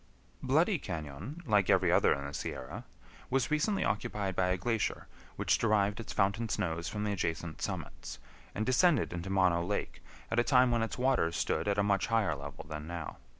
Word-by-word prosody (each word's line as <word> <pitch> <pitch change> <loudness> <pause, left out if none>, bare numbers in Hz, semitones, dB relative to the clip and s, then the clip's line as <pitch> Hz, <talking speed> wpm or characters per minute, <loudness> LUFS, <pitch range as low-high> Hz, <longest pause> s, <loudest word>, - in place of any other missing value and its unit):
Bloody 160 +8 +2
Cañon, 90 - -6
like 105 -3 +3
every - - +4
other - - +4
in 70 - -1
the 70 - -6
Sierra, 85 - -5 0.4
was 135 -2 +1
recently 180 +7 +1
occupied 100 -2 -1
by 90 - +2
a 90 0 +1
glacier, 115 +3 -1 0.3
which - - +1
derived 105 -1 +2
its 115 - -6
fountain 100 +4 +1
snows 85 -2 -2
from 105 -1 -3
the 105 - 0
adjacent 85 -4 -3
summits, - - -5 0.4
and 110 - -1
descended 130 - +3
into 90 +2 -5
Mono 90 -3 +3
Lake, 100 +3 -3 0.3
at - - +2
a - - +4
time 125 -1 +4
when 120 -1 +2
its 115 -3 -2
waters 125 -10 +1
stood - - 0
at 100 0 +1
a 100 - +3
much 100 -1 +1
higher 110 -8 +1
level 70 0 -8
than 75 0 -6
now. 85 -2 -6
100 Hz, 190 wpm, -31 LUFS, 85-120 Hz, 0.4 s, every